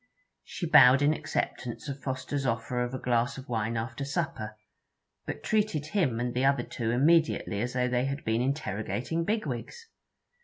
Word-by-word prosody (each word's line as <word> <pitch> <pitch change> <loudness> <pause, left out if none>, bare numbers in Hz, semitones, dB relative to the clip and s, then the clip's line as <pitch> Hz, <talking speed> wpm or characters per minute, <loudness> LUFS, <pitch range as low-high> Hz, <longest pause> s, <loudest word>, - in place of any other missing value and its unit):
She 175 - -5
bowed 140 -3 +7
in 150 +2 +4
acceptance 125 -4 -3
of 140 -1 -5
Fosters 135 +1 -3
offer 125 0 -1
of 120 +1 -2
a - - -2
glass 120 +1 0
of 130 - -9
wine 115 -1 -1
after 115 +4 -4
supper, 140 -8 -3 0.7
but - - -5
treated 210 -9 0
him 145 - +1
and 120 0 -1
the 125 - 0
other 140 +1 +3
two 115 -2 -3
immediately 140 -5 +2
as 125 +1 -2
though 125 0 +1
they 125 0 +1
had 140 +1 -4
been 110 +1 +1
interrogating 135 - -2
bigwigs. 215 - -3
130 Hz, 165 wpm, -29 LUFS, 120-150 Hz, 0.7 s, bowed